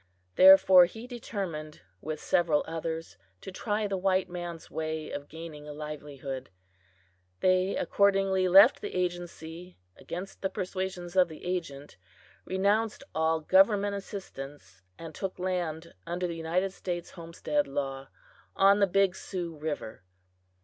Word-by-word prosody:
Therefore 190 -1 +9
he 225 +6 -9
determined, 195 -11 -6 0.2
with 155 0 -4
several 165 -4 +2
others, 165 0 -5 0.2
to - - -8
try 210 +2 -2
the 195 -1 -1
white 190 0 +2
man's 175 -2 -7
way 155 0 -4
of 145 0 -6
gaining 155 -2 -9
a 150 - -6
livelihood. 145 -3 -7 0.9
They 185 +1 +3
accordingly 195 -2 +2
left 195 +7 +7
the - - -6
agency 175 -1 -4 0.2
against 190 +3 -7
the 190 - 0
persuasions 185 -1 -4
of 185 -1 +5
the 160 0 -11
agent, 150 - -4 0.5
renounced 205 +6 0
all 160 0 +1
government 200 +4 +4
assistance, 145 - -8 0.2
and 165 -1 -9
took 190 +4 -5
land 175 -3 -3
under 175 +1 -2
the 170 - -2
United 175 +4 -1
States 175 -3 -5
Homestead 170 - -2
law, 135 -1 -4 0.5
on 200 +1 +5
the 200 - +4
Big 195 0 +2
Sioux 175 -4 -5
river. 145 -9 -5
175 Hz, 130 wpm, -29 LUFS, 160-190 Hz, 0.9 s, Therefore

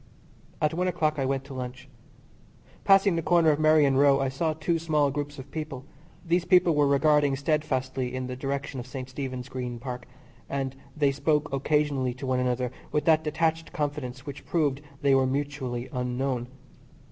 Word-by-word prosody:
At 150 +1 +1
one 180 +2 0
o'clock 155 -4 0
I 135 - +1
went 135 0 -1
to 135 0 -10
lunch. 125 0 -6 1.0
Passing 195 -1 +5
the - - +1
corner 165 0 +4
of 145 - 0
Merrion 155 -3 +4
Row 140 0 +5
I 135 -1 +1
saw 155 +4 -1
two 165 +2 -1
small 150 -3 +2
groups 145 +1 -4
of 135 +1 -10
people. 150 -5 -5 0.4
These 170 +1 +2
people 180 -2 +5
were 145 -1 +3
regarding 145 0 +3
steadfastly 135 -3 -1
in 130 0 -3
the 125 0 -5
direction 135 +1 -3
of 120 - -7
St. 130 -1 -6
Stephen's 130 -1 -5
Green 125 -2 -5
Park, 125 0 -6 0.4
and 135 -1 -2 0.2
they 145 -2 +3
spoke 150 +1 0
occasionally 140 -2 +1
to 135 +2 -7
one 130 -1 +1
another 125 -1 0 0.2
with 150 - 0
that 160 -1 +4
detached 160 +1 -1
confidence 145 -3 -3
which 140 -2 -7
proved 145 -5 0 0.2
they 140 -1 +4
were 135 -1 +4
mutually 135 -3 -3
unknown. 125 0 -2
140 Hz, 175 wpm, -27 LUFS, 130-155 Hz, 1.0 s, Passing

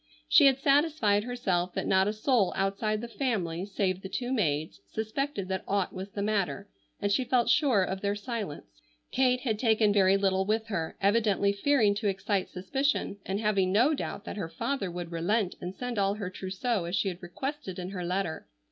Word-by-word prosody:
She 290 - +7
had 265 -1 +4
satisfied 275 -8 +3
herself 185 -8 -1
that - - -1
not 190 +1 +3
a - - +2
soul 220 -2 +2
outside 210 +2 0
the 235 - -5
family 200 -9 -2
save 190 -2 -1
the 190 - -7
two 245 +5 -2
maids 150 - -1
suspected 220 - -3
that 190 0 -2
aught 200 -2 0
was 190 +1 -6
the 200 0 -4
matter, 200 -1 -1 0.3
and 205 - 0
she 255 +6 +2
felt 245 -1 +2
sure 240 -5 +4
of 190 +1 -3
their 200 0 0
silence. 200 - -6 0.3
Kate 250 -1 +2
had 220 -5 -1
taken 220 -3 +3
very 195 -1 +5
little 190 -1 +2
with 220 +3 -1
her, 165 -6 -3
evidently 200 -1 +3
fearing 215 -1 +3
to 205 +1 -2
excite 195 0 -1
suspicion, 270 +3 -1
and 195 +1 -1
having 200 -4 +1
no 240 +10 +4
doubt 225 -7 -4
that - - -6
her 175 -5 -3
father 195 +5 -2
would 175 -1 -6
relent 185 +4 0
and 180 +2 -5
send 245 -3 -3
all 200 0 +2
her 200 -3 -5
trousseau 190 +2 -2
as 175 +3 -2
she 195 - +1
had 185 0 -4
requested 200 - -5
in 180 0 -5
her 180 -3 -4
letter. 180 -2 -2
200 Hz, 195 wpm, -29 LUFS, 190-235 Hz, 0.3 s, She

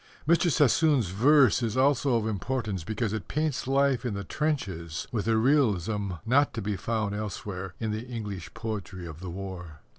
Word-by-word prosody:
Mr. 170 +2 +4
Sassoon's 145 - +3
verse 130 +4 +5
is 115 0 -1
also 135 -1 +3
of 115 -2 +1
importance 110 -3 -2
because 110 +3 -2
it 110 -5 -4
paints 150 -3 -1
life 135 -1 +2
in 120 -5 -2
the 100 - -4
trenches 95 - -2
with 110 -2 -2
a 115 -1 +3
realism 110 - +2
not 140 +5 +3
to - - -2
be 105 0 -1
found 110 0 -2
elsewhere 95 -3 -5
in 110 -2 -2
the 110 +3 -4
English 105 -7 -6
poetry 100 -5 -5
of 80 -2 -8
the 90 0 -6
war. 90 -4 -7
110 Hz, 175 wpm, -28 LUFS, 95-130 Hz, -, verse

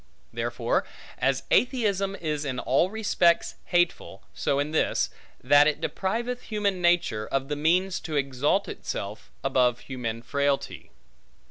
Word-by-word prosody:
Therefore, - - -1 0.4
as - - +1
atheism 200 -6 +2
is 150 -5 -3
in 130 -3 -3
all 135 +8 +2
respects 200 -5 +2
hateful, 175 -1 0
so 140 - 0
in 145 +2 -1
this, 160 - +1 0.3
that 145 +3 +6
it 150 - 0
depriveth 235 +6 -2
human 205 -4 -1
nature 170 -12 +2
of 135 0 -2
the 150 - -1
means 180 +5 +1
to 155 - -5
exalt 140 +7 +1
itself, 100 +2 -6
above 125 -3 +2
human 115 -3 -5
frailty. 140 +2 -1
150 Hz, 130 wpm, -26 LUFS, 135-190 Hz, 0.4 s, that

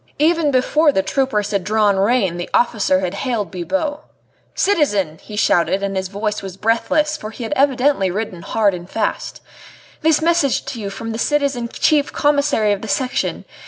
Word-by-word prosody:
Even 320 0 +2
before 290 +4 +3
the 190 - 0
troopers 215 -6 -1
had 200 -3 0
drawn 210 0 +2
rein 195 -3 +1
the 175 - -5
officer 210 -6 +2
had 180 -1 -2
hailed 220 -1 -2
Bibot. 290 - -2 0.6
"Citizen," 205 - +1
he 210 - -10
shouted, 200 -1 +2
and 195 0 -2
his 190 0 -2
voice 210 +2 -3
was 190 -1 -8
breathless, 235 +8 +1
for 215 -8 -7
he 225 +3 -8
had 230 - -2
evidently 270 -6 +2
ridden 190 -2 -4
hard 210 0 +1
and 175 0 -8
fast, 220 -2 -3 0.6
"this 315 0 +3
message 325 -4 +1
to 235 -4 -6
you 200 - -4
from 225 +3 -6
the 225 - -4
citizen 280 -4 0
Chief 290 +3 +1
Commissary 285 -7 +2
of 200 -1 -1
the 220 - -6
Section. 255 +4 -1
225 Hz, 175 wpm, -19 LUFS, 200-285 Hz, 0.6 s, before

